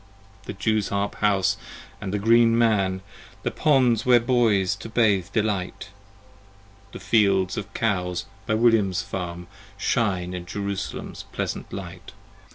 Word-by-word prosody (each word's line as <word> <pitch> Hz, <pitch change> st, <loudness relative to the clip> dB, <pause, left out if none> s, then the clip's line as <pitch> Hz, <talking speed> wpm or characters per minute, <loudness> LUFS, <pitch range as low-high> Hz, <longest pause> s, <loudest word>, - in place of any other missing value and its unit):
30 -, -, -21 dB
The 95 Hz, -, -19 dB
Jew's 110 Hz, 0 st, +1 dB
harp 100 Hz, 0 st, -1 dB
house 100 Hz, -3 st, +2 dB, 0.2 s
& -, -, -21 dB
the 100 Hz, +1 st, -2 dB
Green 115 Hz, +2 st, +4 dB
Man, 100 Hz, -5 st, +2 dB, 0.4 s
The -, -, -1 dB
Ponds 125 Hz, -6 st, +3 dB
where 125 Hz, -1 st, +6 dB
Boys 115 Hz, -6 st, +2 dB
to -, -, -9 dB
bathe 105 Hz, -5 st, +2 dB
delight, 105 Hz, -4 st, -2 dB, 1.0 s
The -, -, -8 dB
fields 100 Hz, -2 st, +2 dB
of 105 Hz, -3 st, -5 dB
Cows 90 Hz, -5 st, -1 dB, 0.2 s
by 110 Hz, -, +1 dB
William's 110 Hz, -5 st, +3 dB
farm, 90 Hz, -2 st, -5 dB, 0.3 s
Shine 95 Hz, -5 st, 0 dB
in 90 Hz, -1 st, -6 dB
Jerusalem's 100 Hz, 0 st, -5 dB
pleasant -, -, -4 dB
sight. -, -, -8 dB
100 Hz, 135 wpm, -24 LUFS, 95-115 Hz, 1.0 s, where